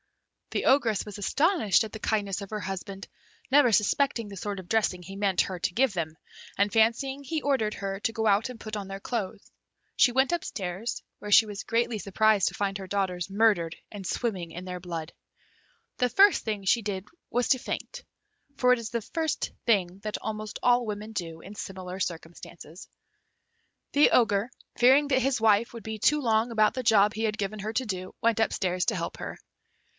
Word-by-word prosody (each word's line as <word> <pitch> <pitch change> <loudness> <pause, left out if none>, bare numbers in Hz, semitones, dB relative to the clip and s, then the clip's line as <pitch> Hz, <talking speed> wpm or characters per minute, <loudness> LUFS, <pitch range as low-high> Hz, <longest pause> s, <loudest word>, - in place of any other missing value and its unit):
The - - -2
Ogress 230 -7 +3
was 210 -1 -8
astonished 265 - +2
at 215 - -10
the 220 - -6
kindness 205 -2 -1
of 200 - -7
her 215 - -3
husband, 195 0 -6 0.4
never 275 -3 +6
suspecting 230 +2 +2
the 200 - -9
sort 200 +1 -4
of 185 - -10
dressing 210 -4 +1
he 190 +3 -9
meant 195 -2 +2
her 185 -2 -4
to 175 - -1
give 255 +1 +2
them, 160 -3 -3 0.4
and 200 +1 +2
fancying 250 +5 +2
he 310 +3 -3
ordered 265 -7 0
her 195 0 -4
to 225 - 0
go 225 0 -1
and 220 +4 +1
put 215 -1 -6
on 200 -2 -5
their 195 0 -6
clothes; 215 -2 -4 0.5
she 245 - +5
went 265 +5 +2
up 345 - -1
stairs, 190 +3 -4 0.2
where 210 - -7
she 220 - +8
was 205 -1 -6
greatly 230 -1 0
surprised 205 0 +2
to - - -13
find 200 -1 -2
her 190 - -7
daughters 185 -2 -2
murdered 195 -5 +2
and 200 -3 -8
swimming 185 -6 -2
in 180 +2 -8
their 180 -1 -5
blood. 165 -3 -6 0.8
The 250 - +2
first 395 - +5
thing 210 -3 -3
she 230 +5 +3
did 200 -2 -4 0.2
was 245 +1 0
to 260 - +4
faint - - -5 0.5
(for 250 0 +5
it 250 - 0
is 225 -2 -5
the 235 0 -2
first 320 +6 -2 0.2
thing 190 -4 +2
that 215 +1 -4
almost 215 -1 -5
all 245 0 +4
women 210 +1 -5
do 165 -5 -5
in 200 +3 -11
similar 185 -2 -7
circumstances). 170 -1 -7 1.0
The 290 +1 +6
Ogre, 215 -1 +3 0.3
fearing 270 +4 +5
that 260 -1 +3
his 265 0 +1
wife 220 0 +3
would 230 -3 -9
be 220 0 -5
too 300 +8 +3
long 230 -2 +1
about 215 -2 +3
the 255 - -3
job 210 -2 +4
he 220 - -3
had 215 -1 0
given 210 +1 -3
her 215 +2 -3
to 255 +3 -1
do, 185 -3 -5
went 230 -1 +2
upstairs 185 -4 0
to - - 0
help - - -4
her. - - -6
215 Hz, 200 wpm, -27 LUFS, 195-235 Hz, 1.0 s, she